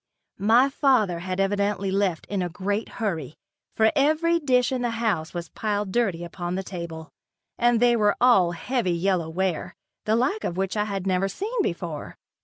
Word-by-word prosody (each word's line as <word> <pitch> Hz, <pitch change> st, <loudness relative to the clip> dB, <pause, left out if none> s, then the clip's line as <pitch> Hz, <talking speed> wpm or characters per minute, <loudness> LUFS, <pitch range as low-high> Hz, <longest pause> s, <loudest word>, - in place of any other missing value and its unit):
My 230 Hz, +6 st, +5 dB
father 255 Hz, -, +2 dB
had 185 Hz, +2 st, -4 dB
evidently 200 Hz, 0 st, 0 dB
left 190 Hz, -4 st, 0 dB
in 200 Hz, -2 st, -2 dB
a 180 Hz, -, -2 dB
great 200 Hz, +5 st, -2 dB
hurry 165 Hz, -, -3 dB, 0.4 s
for 220 Hz, 0 st, +4 dB
every 315 Hz, +4 st, +3 dB
dish 250 Hz, -5 st, +2 dB
in 255 Hz, -1 st, -1 dB
the 240 Hz, -, 0 dB
house 195 Hz, -9 st, -1 dB
was 170 Hz, -2 st, -5 dB
piled 205 Hz, -2 st, -2 dB
dirty 190 Hz, -7 st, 0 dB
upon 175 Hz, +1 st, -4 dB
the 190 Hz, -, -2 dB
table, 170 Hz, -3 st, -7 dB, 0.5 s
and 240 Hz, -1 st, +3 dB
they 240 Hz, 0 st, +4 dB
were 210 Hz, -2 st, +2 dB
all 195 Hz, -9 st, +5 dB
heavy 185 Hz, +2 st, -1 dB
yellow 175 Hz, -1 st, 0 dB
ware, 180 Hz, 0 st, -2 dB, 0.3 s
the 215 Hz, -, +2 dB
like 270 Hz, -, 0 dB
of 175 Hz, -, -3 dB
which 190 Hz, +1 st, -1 dB
I 210 Hz, 0 st, +1 dB
had 195 Hz, -3 st, -4 dB
never 190 Hz, 0 st, +1 dB
seen 400 Hz, -, -5 dB
before. 170 Hz, -, -4 dB
200 Hz, 180 wpm, -25 LUFS, 175-235 Hz, 0.5 s, My